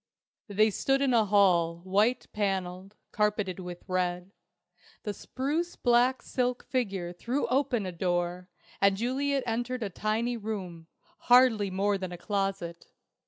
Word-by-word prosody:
They 215 +1 +3
stood 270 +6 +1
in 265 -2 +2
a 225 -2 +4
hall, 175 -5 +3
white 210 +6 +2
panelled, 195 -1 -2 0.2
carpeted 210 -3 0
with 180 -1 -8
red. 180 0 -1 0.7
The 210 - -3
spruce 300 +11 -3
black 245 +1 +3
silk 250 -1 -1
figure 195 -9 -2
threw 245 +10 -2
open 250 -5 +1
a 185 - -3
door, 175 +1 -2 0.3
and 195 -1 +4
Juliet 270 +4 0
entered 240 +1 -2
a 200 - -4
tiny 225 +5 -1
room, 190 -7 -6 0.4
hardly 245 -5 +6
more 195 +1 0
than 185 -1 -5
a 175 - -6
closet. 195 -4 -3
205 Hz, 135 wpm, -29 LUFS, 185-245 Hz, 0.7 s, hardly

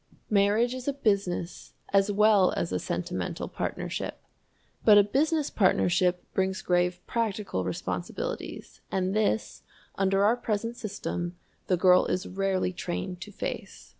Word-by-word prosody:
Marriage 210 +4 +3
is 255 0 -7
a 285 - +1
business 200 -9 -1 0.2
as 195 +1 +4
well 205 -2 +4
as - - -2
a - - 0
sentimental - - -3
partnership. - - -4 0.6
But 210 -2 +8
a 205 - +8
business 295 +8 +1
partnership 180 -2 +2
brings 190 0 0
grave 180 0 +1
practical 210 - -2
responsibilities, 90 0 -5
and 190 +1 0
this, 210 - 0 0.3
under 195 0 +2
our 230 +3 +4
present 230 0 -2
system, 180 -5 -4 0.3
the 180 - +2
girl 180 0 +5
is 185 +2 -1
rarely 190 -1 -1
trained 180 +1 -4
to 205 - -8
face. 205 - -6
195 Hz, 135 wpm, -28 LUFS, 180-215 Hz, 0.6 s, But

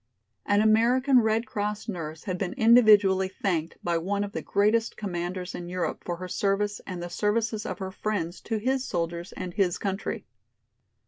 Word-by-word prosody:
An 205 +1 +4
American 245 +5 +4
Red 220 0 +1
Cross 210 -1 -3
nurse 160 -6 -5
had 185 -2 -3
been 185 -2 -2
individually 215 -6 +6
thanked 175 -4 -2
by 170 -1 +1
one 200 +4 -1
of 205 - -5
the 230 - -4
greatest 215 +3 +1
commanders 180 -2 -4
in 175 0 -6
Europe 180 0 -3
for 175 - -3
her 185 +2 -7
service 205 +2 0
and 180 -2 -5
the - - -4
services 215 +4 -1
of - - -4
her 190 -2 -5
friends 185 -4 -3
to 225 - -2
his 260 +4 0
soldiers 170 -4 -3
and 180 -1 -6
his 180 -3 +1
country. 195 0 -3
200 Hz, 175 wpm, -27 LUFS, 180-220 Hz, -, individually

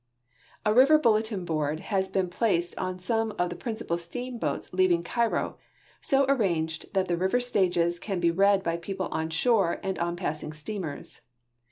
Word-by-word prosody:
A 210 - +3
river 270 +6 +7
bulletin 220 -7 +1
board 155 -2 -1
has 190 -1 +1
been 190 -1 0
placed 175 -2 0
on 185 -1 -3
some 225 +4 -1
of 175 0 0
the - - -4
prin 230 +2 -4
cipal 170 -6 -3
steamboats 245 +7 -4
leaving 180 -2 +3
Cairo, 235 +6 -1 0.4
so 275 0 +3
arranged 170 -11 0
that 190 -1 +2
the 175 - +1
river 190 +7 +2
stages 175 -8 +1
can 195 -2 -3
lie 170 - +3
read 195 +2 +3
by 170 -1 -1
people 185 +2 -4
on 160 0 -2
shore 180 +2 +2
and 190 -3 -2
on 170 0 -1
passing 155 -3 -4
steamers. 155 -1 -6
185 Hz, 170 wpm, -27 LUFS, 170-220 Hz, 0.4 s, river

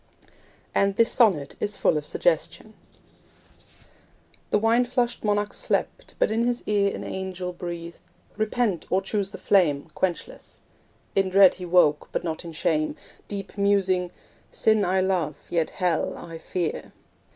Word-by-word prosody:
And 200 0 +2
this 230 +2 +3
sonnet 185 - +3
is 205 0 -2
full - - +2
of 150 -1 -3
suggestion: - - -1 1.8
The - - +3
wine 225 +3 +3
flushed 245 0 -1
monarch 205 -1 0
slept, - - -2
but - - +2
in 225 +1 +1
his 245 0 -1
ear 200 -1 +2
An - - -6
angel 185 -1 -5
breathed 170 -1 -7 0.3
'Repent, 215 -4 -1
or 190 +1 +1
choose 200 -3 -1
the - - -9
flame 160 -6 +2
Quenchless.' 180 -3 -4 0.6
In 195 -1 +2
dread 190 0 +7
he 180 - -8
woke, 170 -4 +3
but - - -2
not 160 -1 -4
in 170 - -7
shame, 155 -1 0 0.3
Deep 200 0 -7
musing 190 -3 +2 0.4
'Sin 220 -2 +2
I 185 +1 +2
love, 180 -6 0 0.2
yet 165 -2 +1
hell 180 -3 -1
I 165 -1 -9
fear.' 170 0 -3
190 Hz, 145 wpm, -25 LUFS, 170-210 Hz, 1.8 s, dread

